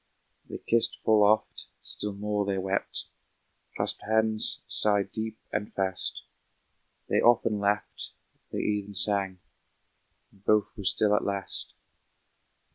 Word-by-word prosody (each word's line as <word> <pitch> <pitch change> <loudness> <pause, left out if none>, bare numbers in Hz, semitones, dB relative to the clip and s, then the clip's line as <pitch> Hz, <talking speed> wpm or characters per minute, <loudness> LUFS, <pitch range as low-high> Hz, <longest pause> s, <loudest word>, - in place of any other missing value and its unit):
They - - -5
kissed 115 0 +2
full 110 -1 +4
oft, 105 +1 +2
still 105 -1 -2
more 105 +1 -1
they 100 -1 -1
wept, 95 +1 -2 0.7
Clasped - - 0
hands, 110 0 +1
sighed 100 -2 +2
deep 110 0 -4 0.2
and 105 0 -2
fast; 95 -2 -1 0.8
They - - +2
often 115 -3 +3
laughed, 100 +1 -1 0.4
they - - -2
even 105 -1 -2
sang, 95 0 +2 0.9
And 100 - -25
both 105 0 +2
were 100 - -8
still 105 +3 +4
at - - +1
last. 100 -1 -2
105 Hz, 120 wpm, -28 LUFS, 100-110 Hz, 0.9 s, full